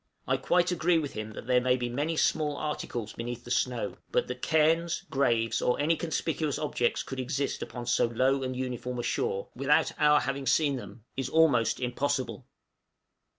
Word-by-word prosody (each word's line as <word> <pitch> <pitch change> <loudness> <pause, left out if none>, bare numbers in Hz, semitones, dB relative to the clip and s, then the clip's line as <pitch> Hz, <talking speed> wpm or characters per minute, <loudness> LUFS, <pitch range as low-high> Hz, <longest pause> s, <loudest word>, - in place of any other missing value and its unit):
I - - +3
quite 175 0 +2
agree 175 0 +2
with 150 -3 -2
him 110 0 -5
that - - -8
there 125 0 +3
may 125 0 +3
be 125 -1 -2
many 145 +7 -2
small 150 -2 +1
articles 120 -7 -4
beneath 120 0 -5
the 120 - -9
snow; 125 -1 0
but - - +2
that - - -6
cairns, 165 +2 +2
graves, 120 -4 +1
or 125 - +1
any 155 +3 +3
conspicuous 160 -2 -1
objects 135 -5 0
could 135 - -6
exist 135 +2 -2
upon 120 -1 -6
so 120 - +2
low 130 +4 +1
and 130 -1 -3
uniform 125 -1 -4
a 120 - -2
shore, 470 - -1
without - - +3
our 150 -1 +5
having 140 -1 -3
seen 140 +2 +3
them, 105 -2 -9
is 135 -1 -2
almost 145 -8 +3
impossible. 130 +2 -2
135 Hz, 180 wpm, -29 LUFS, 125-155 Hz, -, our